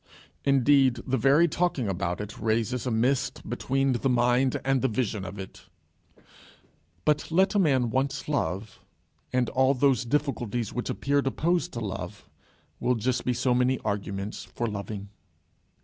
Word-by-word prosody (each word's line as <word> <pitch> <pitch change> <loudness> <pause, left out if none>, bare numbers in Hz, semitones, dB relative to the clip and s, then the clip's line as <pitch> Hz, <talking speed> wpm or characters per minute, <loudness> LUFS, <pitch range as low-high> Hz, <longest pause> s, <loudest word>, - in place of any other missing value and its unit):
Indeed, 135 -1 +4
the 130 - 0
very 140 +7 +4
talking 165 -7 0
about 90 -2 -2
it 105 0 -8
raises 115 +3 0
a - - +1
mist 125 +4 0
between 135 +1 0
the 125 +3 0
mind 125 +1 +2
and 135 -1 +2
the 130 - +2
vision 110 -4 -2
of 95 +1 -7
it. 95 -1 -10 1.4
But 150 -1 +1
let 190 +5 +3
a 205 - +3
man 130 - +2
once 135 +2 -1
love, 105 - -2 0.5
and 125 -1 +1
all 130 +1 +3
those 135 -1 +3
difficulties 120 -5 -1
which 125 - -3
appeared 140 0 0
opposed 170 +5 0
to 115 - -4
love, 95 0 -6 0.5
will 125 0 +1
just 125 +3 -1
be 125 - +2
so 125 +1 +1
many 125 +1 +2
arguments 100 -1 -3
for 120 - -4
loving. 100 -1 -5
125 Hz, 150 wpm, -27 LUFS, 110-135 Hz, 1.4 s, Indeed